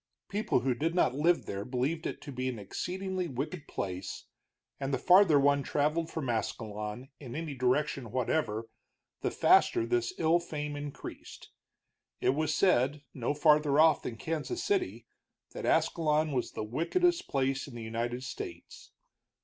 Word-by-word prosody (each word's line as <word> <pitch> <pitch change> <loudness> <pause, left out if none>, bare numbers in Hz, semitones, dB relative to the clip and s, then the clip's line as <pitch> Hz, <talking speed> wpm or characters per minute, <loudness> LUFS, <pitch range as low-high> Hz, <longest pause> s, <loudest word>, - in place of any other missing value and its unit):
People 205 - +1
who 130 0 +1
did 160 +7 -1
not 150 -8 +3
live 165 +5 +2
there 100 0 -4
believed 130 +7 -1
it - - -6
to 145 - -8
be 130 0 -2
an 125 - -4
exceedingly 185 - -3
wicked 150 +3 -5
place, 95 -1 -5 0.5
and 135 0 -2
the 135 - +1
farther 180 +1 +6
one 140 0 +4
traveled 150 +4 0
from 160 -5 -4
Ascalon, 110 +1 -3
in 125 -5 -8
any 160 -2 -4
direction 130 0 0
whatever, 115 -2 -1 0.6
the - - 0
faster 115 - +4
this 120 0 0
ill 165 +1 +3
fame 150 -3 -5
increased. 145 -1 -8 0.7
It - - +2
was 155 +2 0
said, 145 -5 +2
no 130 +3 -2
farther 150 -1 +4
off 160 -1 +6
than 115 - -5
Kansas 165 - -3
City, 390 -3 -1 0.5
that - - -5
Ascalon 155 -1 +2
was 130 -3 -2
the - - -3
wickedest 340 - +1
place 135 0 0
in 130 - -10
the 115 - -6
United 120 +3 -3
States. 380 - -8
145 Hz, 155 wpm, -31 LUFS, 125-160 Hz, 0.7 s, farther